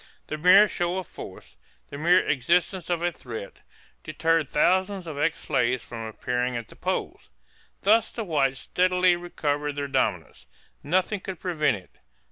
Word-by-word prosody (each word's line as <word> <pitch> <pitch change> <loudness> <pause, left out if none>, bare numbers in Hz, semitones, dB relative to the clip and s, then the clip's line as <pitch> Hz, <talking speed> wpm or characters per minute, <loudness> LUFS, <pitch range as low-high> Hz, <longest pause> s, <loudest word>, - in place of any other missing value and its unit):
The 155 - -5
mere 185 +6 +7
show 175 0 -2
of 190 - -3
force, - - -11 0.3
the 140 - -6
mere 175 +4 +4
existence 170 +6 +1
of 170 -1 -1
a 175 - +1
threat, 115 -10 -8 0.4
deterred 165 - 0
thousands 185 +3 +1
of 155 -3 -6
ex 155 +2 +1
slaves 125 -3 0
from 115 -1 -7
appearing 125 +2 -2
at 115 -1 -7
the - - -12
polls. - - -4 0.5
Thus 220 +3 +4
the 230 - -5
whites 140 -8 0
steadily 180 0 +2
recovered 150 -4 -2
their 145 -1 -3
dominance. 135 - -2 0.3
Nothing 185 +6 0
could 185 -2 -7
prevent 155 - 0
it. 95 - -16
165 Hz, 155 wpm, -26 LUFS, 135-180 Hz, 0.5 s, mere